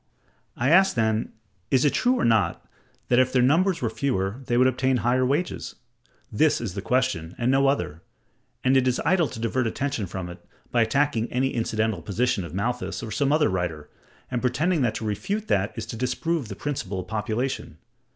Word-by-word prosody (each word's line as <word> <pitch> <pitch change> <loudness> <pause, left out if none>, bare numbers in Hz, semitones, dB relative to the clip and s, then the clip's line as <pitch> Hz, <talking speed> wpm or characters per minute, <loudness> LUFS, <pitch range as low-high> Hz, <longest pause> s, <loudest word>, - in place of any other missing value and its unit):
I 130 +4 +1
ask, 190 +2 +5
then, 110 -1 0 0.4
is 130 +1 +3
it 145 - +3
true 250 +1 +2
or - - +1
not, 110 -7 +2 0.4
that 125 - +4
if 130 0 +3
their 125 -1 +3
numbers 170 +5 +2
were 115 - +1
fewer 115 -3 -1
they 120 - +1
would 130 - +5
obtain 130 0 +2
higher 125 +1 +3
wages? 145 +8 -1 0.6
This 150 +8 +3
is 110 -7 -4
the 100 - -4
question, 100 -9 0
and 120 +1 +1
no 135 +1 +4
other: 85 - -1 0.6
and 130 +1 +3
it 130 -1 +3
is 125 - +1
idle 175 -3 +3
to 115 - -8
divert 115 +2 0
attention 130 -3 -2
from 90 0 -5
it, 90 0 -10 0.3
by 120 - +3
attacking 120 0 +1
any 130 +2 +1
incidental 110 -4 -1
position 105 +3 0
of 85 - -8
Malthus 100 -3 -2
or 110 - -6
some 140 +6 +1
other 150 0 +4
writer, 90 -5 -3 0.4
and 125 - -1
pretending 150 +7 +1
that 120 -4 +1
to 110 - -4
refute 200 - -2
that 100 +1 +1
is 115 - -4
to - - -7
disprove 135 +4 -1
the 100 - -7
principle 100 -10 -3
of 90 - -12
population. 110 - -3
125 Hz, 195 wpm, -25 LUFS, 105-135 Hz, 0.6 s, ask